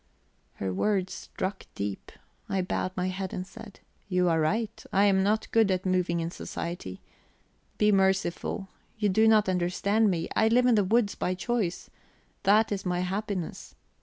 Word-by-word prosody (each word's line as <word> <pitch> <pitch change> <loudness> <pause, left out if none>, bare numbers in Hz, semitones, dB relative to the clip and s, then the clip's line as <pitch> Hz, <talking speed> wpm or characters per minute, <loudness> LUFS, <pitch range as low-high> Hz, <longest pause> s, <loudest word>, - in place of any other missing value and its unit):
Her 95 -1 -3
words 190 - 0
struck 190 +1 -5
deep; 100 -1 -5 0.4
I 190 -1 0
bowed 185 0 -3
my 180 0 0
head 190 0 -4
and 185 - -4
said: 200 +1 -12 0.3
"You 180 -2 +2
are 165 -1 +2
right; 220 +7 -1
I 200 +1 +4
am 195 -1 +4
not 215 +3 0
good 225 -3 +4
at 185 0 0
moving 180 -2 +1
in 165 0 -3
society. 170 - -6 0.7
Be 210 0 +4
merciful. 190 0 0 0.3
You 210 -2 +1
do 220 +4 +4
not 215 -2 +5
understand 190 +4 +1
me; 170 -3 -1
I 220 - +4
live 245 +2 +4
in 250 - +5
the 210 -2 +4
woods 210 +1 +2
by 185 - -2
choice 195 -3 -2 0.5
that 210 +2 +4
is 200 -1 -2
my 180 -1 -1
happiness. 190 -1 -4
190 Hz, 165 wpm, -28 LUFS, 180-210 Hz, 0.7 s, not